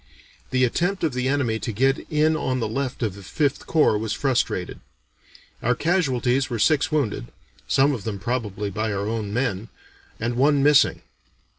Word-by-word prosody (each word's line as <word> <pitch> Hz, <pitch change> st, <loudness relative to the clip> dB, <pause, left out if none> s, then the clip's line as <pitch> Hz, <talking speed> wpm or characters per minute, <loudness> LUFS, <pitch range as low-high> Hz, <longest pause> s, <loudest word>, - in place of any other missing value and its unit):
The 130 Hz, 0 st, +1 dB
attempt 175 Hz, +10 st, 0 dB
of 155 Hz, -5 st, +1 dB
the 125 Hz, 0 st, -1 dB
enemy 130 Hz, -5 st, 0 dB
to 115 Hz, -, -3 dB
get 135 Hz, +5 st, +2 dB
in 155 Hz, +1 st, +3 dB
on 130 Hz, -4 st, -1 dB
the 115 Hz, -, -1 dB
left 130 Hz, +2 st, -3 dB
of 110 Hz, -4 st, -1 dB
the 100 Hz, -, -11 dB
Fifth 140 Hz, -, -1 dB
Corps 150 Hz, -9 st, +3 dB
was 110 Hz, -1 st, -2 dB
frustrated. 135 Hz, -3 st, -1 dB, 0.8 s
Our 125 Hz, +2 st, +1 dB
casualties 135 Hz, -6 st, +1 dB
were 120 Hz, -, -2 dB
six 150 Hz, +6 st, +2 dB
wounded 135 Hz, -, -1 dB, 0.4 s
(some 140 Hz, +2 st, +3 dB
of 115 Hz, -7 st, -5 dB
them 105 Hz, -2 st, -3 dB
probably 105 Hz, -2 st, -3 dB
by 110 Hz, +2 st, -2 dB
our 100 Hz, +1 st, -2 dB
own 110 Hz, -2 st, -3 dB
men) 110 Hz, -3 st, -2 dB, 0.5 s
and 120 Hz, +2 st, -2 dB
one 140 Hz, +1 st, +3 dB
missing. 145 Hz, -1 st, +4 dB
125 Hz, 170 wpm, -23 LUFS, 110-140 Hz, 0.8 s, missing